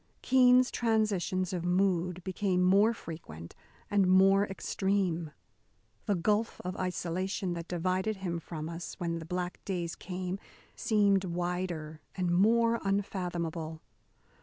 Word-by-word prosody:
Keene's 255 0 +5
transitions 205 -5 0
of 175 -2 -2
mood 180 -1 +1
became 185 -1 0
more 200 +5 +5
frequent 155 - -9 0.4
and 200 -2 +4
more 195 +2 +5
extreme. 190 -4 -1 0.8
The 205 - +2
gulf 210 +5 0
of 180 - -3
isolation 185 +1 -2
that 170 0 -6
divided 185 +4 -1
him 180 -3 -3
from 160 -2 -6
us 170 +1 -6
when 170 -1 -3
the 160 - -8
black 180 +1 -4
days 175 -4 -3
came 185 +1 -5 0.4
seemed 200 -3 +3
wider 175 -3 -3
and 180 -2 0
more 230 +5 +4
unfathomable. 175 -5 -2
185 Hz, 120 wpm, -30 LUFS, 170-200 Hz, 0.8 s, Keene's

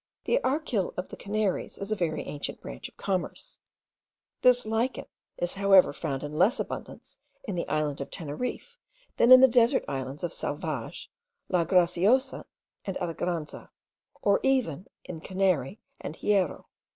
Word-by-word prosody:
The - - +2
archil 260 - -1
of 180 - -4
the - - -8
Canaries 205 -1 -2
is 200 +2 -6
a - - +2
very 160 -5 -1
ancient 145 - -5
branch 60 - -8
of - - -33
commerce; 185 -3 -3 0.8
this 250 -1 +5
lichen 225 +4 -1 0.3
is 175 - -1
however 195 -1 +5
found 140 -4 -4
in 145 0 -5
less 215 +9 +4
abundance - - -6 0.2
in 215 -7 -4
the 175 - -2
island 150 -2 -1
of 140 - -5
Teneriffe 245 - -5 0.4
than 240 - +5
in 255 0 +11
the 265 - +9
desert 240 +1 +3
islands 135 +2 -5
of 175 - -2
Salvage, 145 -5 -4 0.4
La 175 -2 +2
Graciosa, 185 - +2 0.4
and 195 - -3
Alegranza, 170 -2 -4 0.5
or 200 -1 +4
even 255 - 0 0.2
in 165 - -7
Canary 185 - 0 0.2
and 150 - -6
Hierro. 195 -4 0
185 Hz, 150 wpm, -28 LUFS, 160-225 Hz, 0.8 s, in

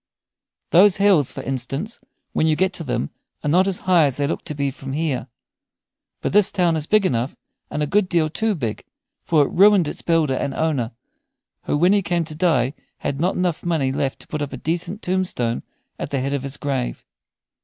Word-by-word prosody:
Those 190 +3 +6
hills, 195 -9 +4
for - - -7
instance, 135 - -3 0.3
when 160 - +2
you 155 - +3
get 190 +3 +1
to 175 - -4
them 125 - -2 0.3
are - - -2
not 180 +6 +4
as 190 -2 -1
high 180 -4 +4
as 135 -3 0
they 145 - +1
look 145 - -2
to 150 - -5
be 140 -1 -1
from 135 0 -7
here. 150 -3 -1 0.9
But - - -2
the 210 - +7
town 180 -4 +3
is 155 -1 -2
big 215 -2 +3
enough, 125 -4 0 0.3
and 150 - -2
a - - +2
good 190 +5 +1
deal 165 -3 +2
too 215 +7 -1
big; 120 -9 -4 0.4
for 155 -3 +3
it - - -5
ruined 195 -3 +5
its - - -4
builder 165 -5 +2
and 135 +1 -2
owner, 150 -8 0 0.8
who - - 0
when 175 +5 +4
he 205 - +3
came 175 -2 0
to 155 -1 -6
die 150 -6 +2 0.2
had 140 - -3
not 180 -1 0
money 160 -6 +1
enough 135 - -3
left 135 -1 -1
to - - -13
put 150 - -4
up 145 -1 -4
a - - -4
decent 175 - -2
tombstone 180 -11 0 0.4
at - - -4
the 140 - -1
head 135 +2 -2
of 140 - -1
his 140 +1 -4
grave. 135 - -3
155 Hz, 210 wpm, -22 LUFS, 140-180 Hz, 0.9 s, the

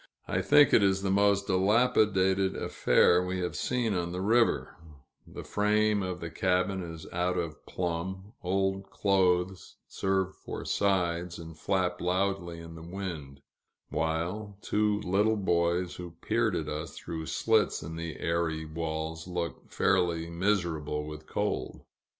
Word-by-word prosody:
I - - 0
think 145 -1 +6
it - - +7
is 95 -1 +2
the 95 - +1
most 100 0 +3
dilapidated 95 -2 +3
affair 90 +1 +3
we 90 +1 -2
have 90 - -3
seen 120 -4 0
on 85 -2 -1
the 90 - -4
river 115 +5 +2 0.5
the - - -8
frame 105 0 +2
of 90 -1 -4
the 85 -1 -5
cabin 95 +2 +1
is 80 -2 -7
out 90 +1 0
of 85 -3 -4
plumb, 95 +4 -4
old 95 +1 -1
clothes 95 -2 +1
serve 95 -1 -1
for - - -6
sides 90 -3 0
and 80 -1 -9
flap 90 +1 -1
loudly 90 -1 -1
in 85 0 -9
the 80 - -10
wind; 85 -6 -6 0.5
while 90 +6 -2
two 105 0 +1
little 105 +3 +2
boys, 85 -2 +1
who 85 -2 -8
peered 110 -3 +1
at 75 - -2
us 75 0 -5
through 80 -1 -6
slits 110 -7 +1
in 80 +1 -6
the 85 -1 -5
airy 80 -1 -1
walls, 80 +1 -4
looked 85 -2 -4
fairly 85 -2 +1
miserable 85 -5 0
with 75 0 -9
cold. - - -2
90 Hz, 145 wpm, -29 LUFS, 85-100 Hz, 0.5 s, it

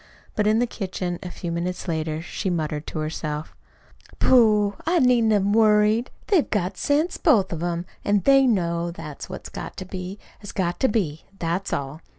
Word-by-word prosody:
But 210 -1 +1
in 215 +1 +4
the 240 - +3
kitchen, 185 -6 -4
a 180 - -6
few 175 -1 -5
minutes 180 +2 -3
later, 160 -1 -2
she 190 +3 -3
muttered 155 -3 -2
to - - -5
herself: 155 0 -4 0.6
"Pooh! 210 -5 +4
I 350 +2 +3
needn't 245 -6 +4
have 205 -2 +3
worried. 215 +2 +4 0.2
They've 370 -8 +2
got 190 -2 -1
sense, 300 - +1
both 220 - +3
of 165 - -4
'em, 175 0 -2 0.2
an' 205 -1 +2
they 270 +5 +5
know 170 -6 +1
that 165 -4 -8
what's - - -8
got - - -7
to 185 - -5
be 185 +1 -6 0.2
has 205 - -9
got 175 -2 -1
to 265 - +3
be. 175 - -1
That's 175 +2 -2
all. 140 +3 -3
190 Hz, 180 wpm, -24 LUFS, 170-220 Hz, 0.6 s, they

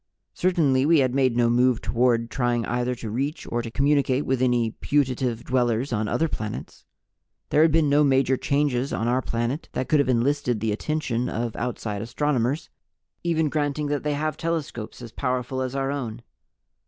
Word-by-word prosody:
Certainly 150 -7 +2
we 165 0 +5
had 130 -2 +1
made 130 -3 +2
no 120 -1 +4
move 125 0 +3
toward 120 -1 +1
trying 120 -3 0
either 125 +2 -1
to 115 -3 -6
reach 140 +7 -2
or 120 - 0
to 115 - -6
communicate 140 +1 +1
with 130 -1 0
any 120 -3 +2
putative 130 -4 0
dwellers 125 0 0
on 105 -1 0
other 165 +9 +1
planets. 110 -8 -6 0.7
There 150 - +4
had 160 0 +5
been 160 -1 +3
no 145 +1 +4
major 135 -1 +3
changes 140 -1 0
on 115 - -1
our 125 +2 +2
planet 120 +6 -3
that 130 - -2
could 155 - +4
have 140 - +2
enlisted 125 -1 +1
the 110 0 -1
attention 125 0 -1
of 115 0 -3
outside 105 -4 -3
astronomers, 135 +3 -1 0.6
even 165 -2 +1
granting 145 0 -1
that 145 -1 -1
they 150 -1 -1
have 155 0 -2
telescopes 150 -9 -4
as 115 - -9
powerful 130 0 -2
as 130 0 -3
our 135 0 -1
own. 125 -5 -5
130 Hz, 180 wpm, -24 LUFS, 120-145 Hz, 0.7 s, we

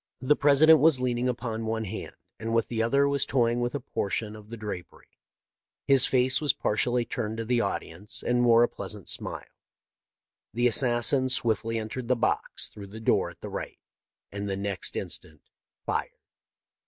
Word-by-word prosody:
The 135 +3 +3
President 150 +3 +6
was 155 -4 +4
leaning 125 0 0
upon 115 -2 -3
one 110 0 -2
hand, 110 +2 -6 0.2
and 115 +1 -2
with 115 - +1
the 115 -2 -1
other 140 +5 +3
was 140 -1 +1
toying 120 -2 +1
with 120 +3 -2
a - - -1
portion 105 0 -3
of 105 0 -13
the 115 - -7
drapery. 105 -5 -8 0.8
His 135 -2 +6
face 130 +1 +2
was 150 -3 +3
partially 120 +3 0
turned 110 -1 -4
to 115 - -3
the 120 +1 +1
audience, 105 +2 -3
and 125 0 +2
wore 120 -1 +6
a - - +4
pleasant 105 -5 -6
smile. - - -4 0.5
" - - -65
The 120 +1 +3
assassin 125 +2 +2
swiftly 115 -2 0
entered 115 +3 -5
the 125 - +3
box 115 - -1
through 100 -1 -10
the 105 +3 -10
door 110 - +1
at - - -16
the - - -6
right, - - -6 0.5
and 100 0 -4
the 95 - -2
next 100 -1 -3
instant 80 -1 -4 0.4
fired. - - -2
115 Hz, 180 wpm, -27 LUFS, 110-125 Hz, 0.8 s, President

